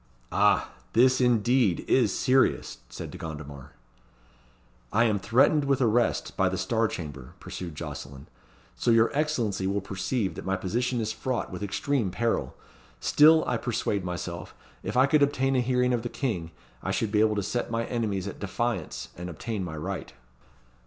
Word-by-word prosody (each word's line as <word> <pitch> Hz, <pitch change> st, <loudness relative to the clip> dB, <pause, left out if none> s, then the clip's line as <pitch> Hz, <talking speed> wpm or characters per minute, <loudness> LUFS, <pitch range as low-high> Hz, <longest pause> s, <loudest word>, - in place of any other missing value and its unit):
"Ah! -, -, +3 dB, 0.2 s
this, 130 Hz, +3 st, +5 dB
indeed, 120 Hz, -5 st, +3 dB
is -, -, +3 dB
serious," 130 Hz, +1 st, +2 dB
said -, -, -7 dB
De 90 Hz, -, -9 dB
Gondomar. 75 Hz, -5 st, -8 dB, 1.2 s
"I 110 Hz, +3 st, +4 dB
am 110 Hz, -3 st, +2 dB
threatened 130 Hz, +8 st, +3 dB
with 140 Hz, -1 st, +2 dB
arrest 120 Hz, -1 st, +1 dB
by 95 Hz, -1 st, +2 dB
the 95 Hz, -, -3 dB
Star 115 Hz, +4 st, +1 dB
Chamber," 70 Hz, -10 st, -7 dB
pursued 85 Hz, -4 st, -7 dB
Jocelyn; 70 Hz, -2 st, -7 dB, 0.5 s
"so -, -, -1 dB
your 115 Hz, 0 st, +5 dB
Excellency 120 Hz, -11 st, 0 dB
will 100 Hz, +1 st, 0 dB
perceive 95 Hz, +1 st, -2 dB
that -, -, -7 dB
my 95 Hz, 0 st, 0 dB
position 120 Hz, +7 st, -1 dB
is 110 Hz, 0 st, -2 dB
fraught 130 Hz, 0 st, -3 dB
with 90 Hz, -, -6 dB
extreme 110 Hz, +2 st, 0 dB
peril. 115 Hz, +5 st, -1 dB, 0.4 s
Still 155 Hz, -, +6 dB
I -, -, +1 dB
persuade 110 Hz, -5 st, -1 dB
myself, 90 Hz, -2 st, -5 dB, 0.3 s
if -, -, -3 dB
I 130 Hz, -, +7 dB
could 150 Hz, +2 st, +3 dB
obtain 135 Hz, -1 st, +2 dB
a 125 Hz, -, +3 dB
hearing 125 Hz, 0 st, +2 dB
of 120 Hz, -, 0 dB
the 120 Hz, -, -4 dB
King, 100 Hz, -, -2 dB, 0.3 s
I -, -, -4 dB
should 110 Hz, -, 0 dB
be 105 Hz, -, +2 dB
able 110 Hz, -1 st, +3 dB
to 100 Hz, -, -1 dB
set 120 Hz, +5 st, -2 dB
my 115 Hz, 0 st, -1 dB
enemies 105 Hz, -5 st, -2 dB
at 100 Hz, -, -7 dB
defiance 100 Hz, -3 st, -3 dB
and 90 Hz, +1 st, -6 dB
obtain 100 Hz, +5 st, -4 dB
my 80 Hz, -3 st, -5 dB
right." 90 Hz, +1 st, -5 dB
110 Hz, 170 wpm, -27 LUFS, 95-125 Hz, 1.2 s, I